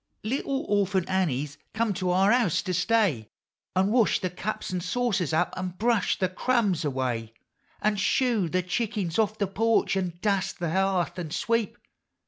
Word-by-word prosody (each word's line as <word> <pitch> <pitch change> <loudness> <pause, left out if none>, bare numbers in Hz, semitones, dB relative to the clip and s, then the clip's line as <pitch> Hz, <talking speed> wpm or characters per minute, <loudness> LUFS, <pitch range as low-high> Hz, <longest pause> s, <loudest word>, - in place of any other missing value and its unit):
Little 270 +4 -1
Orphant 195 -3 +1
Annie's 150 -6 -1 0.2
come 225 -2 +1
to 185 0 -2
our 190 +3 +4
house 200 -10 +2
to 185 - -2
stay, 180 - +1 0.5
An' 190 +2 +2
wash 235 -2 +3
the 185 - -2
cups 190 +3 -4
and 180 -1 -2
saucers 195 - 0
up, 160 - +1
an' 185 -1 -4
brush 230 -2 +1
the 185 - +1
crumbs 195 -3 +1
away, 125 -5 -2 0.5
An' 210 0 +2
shoo 210 -1 +1
the 185 +2 0
chickens 195 -1 -2
off 215 0 +1
the 200 - +1
porch, 220 +2 +1
an' 180 -3 -2
dust 195 -1 0
the 170 -3 -2
hearth, 185 -1 0
an' 170 -3 -4
sweep. 230 +6 -1
190 Hz, 165 wpm, -27 LUFS, 175-215 Hz, 0.5 s, our